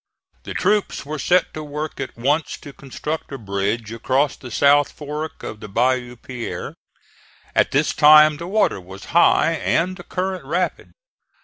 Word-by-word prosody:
The - - -6
troops 210 -7 0
were 150 +1 -5
set 180 +6 +2
to 155 - -5
work 150 +1 -5
at - - -6
once 145 +6 0
to 145 - -10
construct 150 +5 -6
a 135 - -5
bridge 105 +1 -2
across 130 +5 0
the 125 - -10
South 145 +4 +4
Fork 150 +1 -6
of 105 - -6
the 105 - -8
Bayou 125 +3 0
Pierre. 125 0 -6 0.8
At - - +3
this 150 +3 +1
time 150 0 +7
the 170 +2 -7
water 200 - +1
was 95 +2 -11
high 165 -1 +5
and 175 +2 0
the - - -10
current 185 -2 -3
rapid. 175 +6 -2
145 Hz, 165 wpm, -21 LUFS, 125-160 Hz, 0.8 s, time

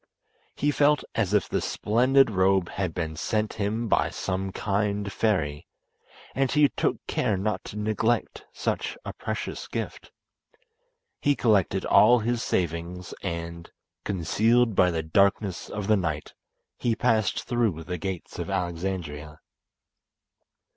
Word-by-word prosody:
He 145 - +1
felt 145 0 +3
as 105 -5 0
if 105 -1 +2
the - - -1
splendid 125 +3 +3
robe 95 -2 +2
had 95 -3 -2
been 80 -2 -3
sent 110 +6 -1
him 110 +3 -1
by - - +2
some 95 0 -3
kind 100 0 -1
fairy, 80 -10 0 0.7
and 135 0 +1
he 150 -1 +5
took - - 0
care 105 - 0
not 95 -1 -2
to 105 - -7
neglect 110 +2 -1
such - - -2
a - - -5
precious - - -5
gift. - - -5 1.1
He 145 0 +3
collected 105 -8 +2
all 125 - +6
his 120 +1 -1
savings, 85 +1 -2
and, 85 0 -5 0.3
concealed 110 +5 +2
by 90 - +5
the 80 -2 -2
darkness 100 +3 +1
of 105 -1 -4
the 110 +1 +4
night, 80 -5 -3 0.5
he 115 -2 +1
passed 110 -2 +1
through 115 -10 0
the 90 +1 -5
gates 95 0 -5
of - - -4
Alexandria. 85 -5 -3
100 Hz, 135 wpm, -26 LUFS, 85-110 Hz, 1.1 s, all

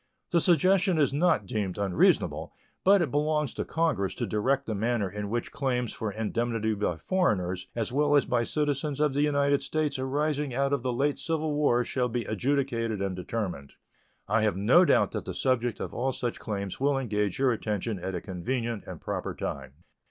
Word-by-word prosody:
The 170 - +3
suggestion 185 +2 +3
is 145 -2 +2
not 145 - +2
deemed 95 -2 -2
unreasonable, 95 -3 +2 0.3
but 195 -1 +5
it 145 - -3
belongs 150 -1 0
to - - -3
Congress 160 - 0
to - - -2
direct 135 +6 0
the 110 - -2
manner 110 0 0
in 105 +2 -5
which 120 +2 -2
claims 125 -4 -1
for 110 -2 -3
indemnity 110 +1 -1
by 100 -4 -1
foreigners 95 - 0
as 115 -2 -2
well 145 +2 +3
as 145 - +4
by 120 -1 +1
citizens 145 +2 -1
of 150 -2 +2
the 145 - +1
United 140 -1 +2
States 145 -1 -1
arising 145 0 -1
out 140 +1 +1
of 140 - +1
the 125 0 -1
late 140 +4 0
civil 160 -2 -1
war 145 -5 +3
shall 125 +1 -1
be 120 0 -2
adjudicated 115 -2 -1
and 95 -1 -2
determined. 90 -7 -4 0.5
I 110 - +2
have 105 -4 +1
no 125 - +5
doubt - - +3
that - - -4
the - - -5
subject 120 -3 0
of - - -5
all 130 +2 -1
such 120 -1 -3
claims 100 -3 -4
will 140 +1 +2
engage 105 -6 -1
your 135 -1 +3
attention 105 -2 -2
at 95 +1 -4
a 90 - -3
convenient 115 +4 -3
and - - -7
proper - - -4
time. 70 +4 -6
125 Hz, 190 wpm, -28 LUFS, 105-145 Hz, 0.5 s, but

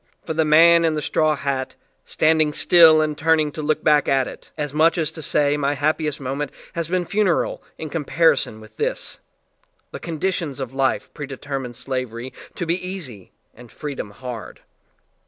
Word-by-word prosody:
For - - -3
the 160 0 +2
man 170 +2 +6
in 160 -1 +2
the 150 - -2
straw 155 -1 +2
hat, 135 -2 -3 0.3
stand 160 0 +2
ing 150 -1 +1
still 160 -2 +6
and 150 -1 -2
turning 155 -1 +2
to 155 - -6
look 155 0 0
back 150 -2 +4
at 135 -2 +2
it - - -11
as 150 -2 -3
much 160 +3 +3
as 160 -3 0
to 160 - -9
say 145 0 +1
my 145 0 0
happiest 150 +1 0
moment 135 +2 -3 0.2
has 170 -2 -3
been 180 0 0
funereal 200 -2 0 0.2
in 155 -2 -6
comparison 160 -6 +1
with 110 - -16
this, - - -2 0.7
the - - -7
con 165 -3 -6
ditions 165 -7 -2
of 130 -2 -5
life 135 -1 -1
pre 145 - -6
determined 135 -2 -5
slavery 130 -1 -4 0.2
to 175 - -3
be 170 +3 -1
easy 155 - -7 0.2
and 120 0 -15
freedom 145 -8 -6
hard. 120 +1 -8
150 Hz, 180 wpm, -22 LUFS, 135-160 Hz, 0.7 s, man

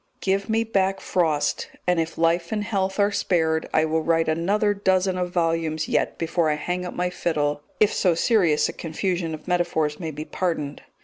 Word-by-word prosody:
Give 195 +2 0
me 225 +1 +2
back 195 -3 0
Frost, 155 -5 0 0.2
and, 180 -1 +2
if 165 0 -2
life 170 +1 +1
and 210 -1 -1
health 195 -2 -1
are 200 0 +3
spared, 160 -5 0
I 155 - +3
will 160 +1 0
write 165 0 +1
another 200 +7 +1
dozen 190 -2 +1
of 180 -1 -1
volumes 165 -2 0
yet - - 0
before 165 -1 0
I 150 - +1
hang 180 +4 -3
up - - -7
my 180 0 -1
fiddle 150 -4 -1 0.2
if 215 -1 +4
so 180 -3 +2
serious 175 -6 +3
a - - -5
confusion 170 0 -2
of 155 - -15
metaphors 170 -4 0
may 165 -3 -4
be 155 0 -6
pardoned. 155 -6 -3
175 Hz, 190 wpm, -24 LUFS, 160-190 Hz, 0.2 s, if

